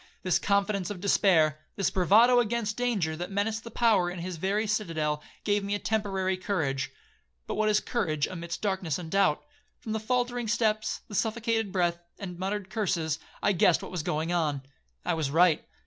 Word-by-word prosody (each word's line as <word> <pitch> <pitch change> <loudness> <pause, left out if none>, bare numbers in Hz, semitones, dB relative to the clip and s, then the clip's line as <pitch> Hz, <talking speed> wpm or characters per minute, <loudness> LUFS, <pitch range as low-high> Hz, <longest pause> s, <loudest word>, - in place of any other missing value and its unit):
This 185 -2 +2
confidence 200 -2 +1
of 205 -3 -5
despair, 170 -6 +3 0.2
this 195 - 0
bravado 220 +7 +5
against 230 -2 0
danger, 215 -11 0
that 175 +2 -4
menaced 215 +3 -1
the 230 - -8
power 215 -6 +3
in 180 - -6
his 175 0 -5
very 200 +6 0
citadel, 165 -8 -1 0.2
gave 205 -1 +1
me 200 +1 -1
a - - 0
temporary 195 -2 -1
courage,—but 135 - -4
what 215 0 +1
is 210 0 +4
courage 155 - -1
amid 170 -2 -5
darkness 190 -7 -1
and 165 -3 -8
doubt? 195 -6 +2 0.3
From 220 - -7
the 220 - -1
faultering 245 +1 -1
steps, 215 -1 0
the - - -11
suffocated 225 0 0
breath, 175 -2 +1 0.2
the 200 - -6
muttered 190 +2 -4
curses, 170 -8 -1 0.2
I - - +4
guessed 180 -2 +3
what - - -7
was 180 -3 -2
going 155 +3 -1
on. 150 -5 0 0.4
I - - +1
was 155 -4 -1
right. 165 +2 +4
195 Hz, 180 wpm, -28 LUFS, 170-215 Hz, 0.4 s, bravado